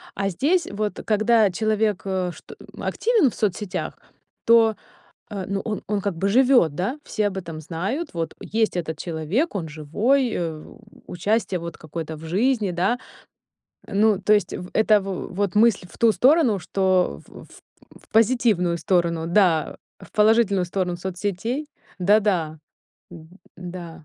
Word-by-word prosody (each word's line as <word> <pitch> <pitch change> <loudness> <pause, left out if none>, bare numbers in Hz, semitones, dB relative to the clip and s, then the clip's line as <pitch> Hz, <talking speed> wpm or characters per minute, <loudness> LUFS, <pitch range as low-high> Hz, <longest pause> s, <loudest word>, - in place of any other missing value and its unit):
а 195 0 -1
здесь 310 - +1
вот, 210 0 -3
когда 215 -1 +3
человек, 215 0 0
э, 185 -2 -1
что, - - -13
э, - - -13 0.2
активен 450 - +2
в - - -11
соцсетях, 195 -2 -2 0.5
то, 225 -1 +5 0.6
э, 200 -3 -4
ну, 195 0 -1
он 215 -2 -3
он 205 -1 0
как 200 -2 -2
бы 195 +4 0
живёт, 245 - +4
да, 245 +11 -2
все 215 -2 -1
об 195 - -8
этом 165 -4 -7
знают. 185 - -4
Вот 165 -1 -3
есть 220 -3 -1
этот 160 -3 -3
человек, 170 - -2
он 170 - -3
живой, 210 - +1
э, 160 -3 -3 0.4
участие 195 +1 -1
вот 170 0 -7
какое-то 160 0 -6
в 150 - -13
жизни, 210 +4 +1
да. 185 +8 0 0.9
Ну, 205 0 +2
то 210 - +1
есть 205 -3 +1
в 180 - -7
это, 215 -1 +4
в 190 -1 -5
вот 200 0 -1
мысль 215 -3 +4
в - - -15
ту 230 -1 +4
сторону, 260 - +4
что 185 - +1
в - - -13 0.5
в - - -19
позитивную 220 -6 +2
сторону, 170 -2 0
да, 170 -4 +2 0.2
в - - -15
положительную 210 -3 +3
сторону 180 0 -2
соцсетей 200 - -3 0.3
Да-да, 185 -5 +2 0.5
м, 165 -2 -12 0.3
да. 175 -3 -9
195 Hz, 150 wpm, -23 LUFS, 175-220 Hz, 0.9 s, то